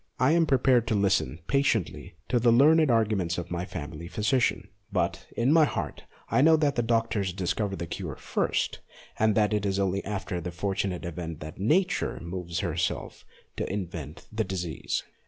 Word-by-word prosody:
I 130 Hz, +3 st, +4 dB
am 165 Hz, 0 st, +3 dB
prepared 130 Hz, -3 st, +3 dB
to 110 Hz, -, +1 dB
listen 95 Hz, -11 st, +1 dB
patiently 125 Hz, -, 0 dB
to 125 Hz, -, +2 dB
the 120 Hz, 0 st, +4 dB
learned 155 Hz, +5 st, +6 dB
arguments 105 Hz, -7 st, +1 dB
of 85 Hz, 0 st, -5 dB
my 90 Hz, 0 st, -2 dB
family 85 Hz, -2 st, -7 dB
phy 105 Hz, +4 st, -5 dB
sician, 125 Hz, +3 st, +2 dB, 0.2 s
but -, -, -1 dB
in 125 Hz, +5 st, +3 dB
my 160 Hz, -1 st, +6 dB
heart -, -, -4 dB, 0.3 s
I -, -, +4 dB
know 160 Hz, +2 st, +7 dB
that 150 Hz, -2 st, +2 dB
the 120 Hz, -, +1 dB
doctors 115 Hz, -4 st, 0 dB
discover 95 Hz, +2 st, -1 dB
the 85 Hz, -, -4 dB
cure -, -, -5 dB
first, -, -, -1 dB, 0.4 s
and 110 Hz, -1 st, +3 dB
that 105 Hz, -1 st, +3 dB
it 105 Hz, -1 st, 0 dB
is 100 Hz, -1 st, 0 dB
only 100 Hz, 0 st, 0 dB
after 95 Hz, -3 st, -3 dB
that 90 Hz, +1 st, -5 dB
fortunate 95 Hz, -1 st, -2 dB
event 80 Hz, -1 st, -5 dB
that 75 Hz, +3 st, -8 dB
Nature 175 Hz, -, +1 dB
moves 85 Hz, 0 st, -4 dB
herself 85 Hz, -1 st, -2 dB, 0.3 s
to -, -, -2 dB
invent 85 Hz, -6 st, -5 dB
the 110 Hz, +1 st, 0 dB
disease. 90 Hz, -6 st, -3 dB
100 Hz, 175 wpm, -27 LUFS, 85-120 Hz, 0.4 s, know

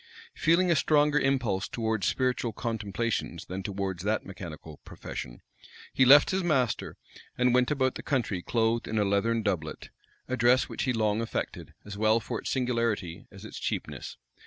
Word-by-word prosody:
Feeling 175 Hz, +2 st, +3 dB
a -, -, +4 dB
stronger 150 Hz, 0 st, +3 dB
impulse 125 Hz, -9 st, 0 dB
towards 110 Hz, -4 st, -1 dB
spiritual 125 Hz, -3 st, 0 dB
contemplations 110 Hz, -5 st, -3 dB
than 95 Hz, +1 st, -5 dB
towards 95 Hz, -2 st, -3 dB
that 105 Hz, +3 st, -1 dB
mechanical 80 Hz, -6 st, -9 dB
profession, -, -, -8 dB, 0.5 s
he 130 Hz, -, +4 dB
left 145 Hz, +3 st, +8 dB
his 190 Hz, 0 st, 0 dB
master, 135 Hz, -9 st, 0 dB, 0.4 s
and 125 Hz, -1 st, +3 dB
went 125 Hz, 0 st, +3 dB
about 130 Hz, -3 st, +1 dB
the -, -, -7 dB
country 115 Hz, -9 st, -1 dB
clothed 115 Hz, +3 st, 0 dB
in 110 Hz, -, -2 dB
a 105 Hz, -, +3 dB
leathern 110 Hz, +3 st, +1 dB
doublet, 85 Hz, -7 st, -3 dB, 0.4 s
a 130 Hz, -, -1 dB
dress 125 Hz, +1 st, +4 dB
which -, -, -3 dB
he 130 Hz, -, +1 dB
long 110 Hz, -1 st, +1 dB
affected, 115 Hz, -, -4 dB
as 100 Hz, 0 st, -8 dB
well 110 Hz, +1 st, +4 dB
for -, -, -4 dB
its -, -, -4 dB
singularity 115 Hz, -9 st, -1 dB
as -, -, -12 dB
its -, -, -8 dB
cheapness. -, -, -4 dB
115 Hz, 165 wpm, -28 LUFS, 100-130 Hz, 0.5 s, left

